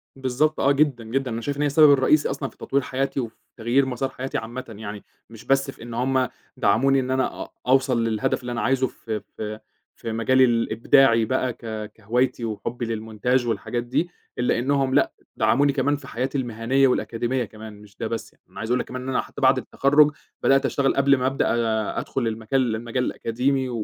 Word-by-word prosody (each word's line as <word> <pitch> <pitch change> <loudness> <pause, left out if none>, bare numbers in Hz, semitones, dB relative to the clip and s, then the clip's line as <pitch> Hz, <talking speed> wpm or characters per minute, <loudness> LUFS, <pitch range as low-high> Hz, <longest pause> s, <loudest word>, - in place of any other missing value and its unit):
بالضبط 135 +4 0
آه، 140 - +4
جدًا، 140 -4 +2
جدًا، 130 +3 -2
أنا 115 +1 -3
شايف 140 +4 -3
إن - - -2
هي 150 - +3
السبب 150 +1 +6
الرئيسي 140 +2 +4
أصلًا 135 - -3
في - - -25
تطوير 140 +1 0
حياتي 135 +1 -2
وفي 115 -3 -4 0.2
تغيير 120 +4 +2
مصار 130 +1 -2
حياتي 130 0 -4
عامةً 120 +3 -5
يعني، 105 -1 -7 0.3
مش 115 -2 -13
بس 135 0 +2
في - - -18
إن 120 0 -8
هُم 130 +2 +1 0.3
دعموني 135 +3 +3
إن 130 0 -2
أنا 130 0 -1
أ - - -12 0.2
أوصل 130 -2 +3
للهدف 110 +2 0
اللي 125 -1 -5
أنا 115 -2 -2
عايزه 130 +3 +2
في 110 -3 -6 0.2
في 110 0 -5 0.4
في 115 - -6
مجالي 130 +4 +4
الإبداعي 115 +1 +3
بقى 130 0 0
ك 110 -2 -6
كهوايتي 120 +3 0
وحُبّي 115 +2 -4
للمونتاج 115 +3 -1
والحاجات 120 +1 -2
دي 140 +8 -1 0.3
إلّا 125 -1 +1
إنهم 135 +1 +1
لأ - - +3 0.2
دعموني 140 +3 +3
كمان 140 +1 +1
في 145 - -10
حياتي 130 +4 -2
المهنية 125 +2 +1
والأكاديمية 120 0 -1
كمان 110 +1 -11
مش 100 -2 -17
ده 115 - -3
بس 115 -1 -5
يعني، - - -35
أنا - - -11
عايز 110 +2 -3
أقول 125 - +3
لَك - - -2
كمان 130 0 -6
إن 130 - -5
أنا 130 - +1
حتّى - - -10
بعد - - +5
التخرّج 145 +2 +3 0.3
بدأت 135 0 +4
أشتغل 140 -1 +1
قبل 140 0 +4
ما 130 0 0
أبدأ 135 +1 0 0.5
أدخل 125 -3 -2
المجال 115 +2 0
المجال 120 +3 -2
الأكاديمي 130 +3 -1
125 Hz, 200 wpm, -24 LUFS, 115-135 Hz, 0.5 s, السبب